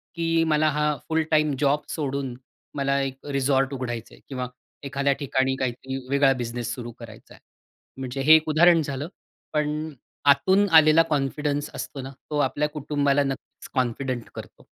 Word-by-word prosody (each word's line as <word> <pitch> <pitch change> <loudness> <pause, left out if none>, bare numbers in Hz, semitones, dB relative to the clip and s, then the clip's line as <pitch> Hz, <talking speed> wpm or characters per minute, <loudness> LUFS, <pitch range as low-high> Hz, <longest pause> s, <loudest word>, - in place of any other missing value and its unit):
की 165 -1 +1
मला 155 0 +3
हा 150 0 +1
फुल 160 0 +2
टाईम 155 -2 +3
जॉब 145 +1 +2
सोडून 140 -4 -3 0.4
मला 140 -1 +1
एक 135 -1 -5
रिसॉर्ट 135 0 +1
उघडायचं 120 -3 -5
आहे - - -17
किंवा 130 -2 -3 0.4
एखाद्या 140 0 0
ठिकाणी 130 -2 0
काहीतरी 130 +1 -3
वेगळा 140 0 +4
बिझनेस 120 0 -3
सुरु 120 -1 -7
करायचा 110 -2 -12
आहे. - - -18 0.6
म्हणजे 130 +1 -4
हे 155 +4 +8
एक 160 0 +2
उदाहरण 165 +2 +5
झालं. 140 0 -4 0.5
पण 150 +1 -1 0.4
आतून 190 +9 +3
आलेला 155 +1 +5
कॉन्फिडन्स 145 0 -1
असतो 135 - -6
ना, 135 +1 -7 0.2
तो 150 - -2
आपल्या 150 +3 -1
कुटुंबाला 145 -1 +1
नक्कीचं 135 -1 -6
कॉन्फिडंट 125 0 -2
करतो. - - -10
140 Hz, 155 wpm, -25 LUFS, 130-150 Hz, 0.6 s, हे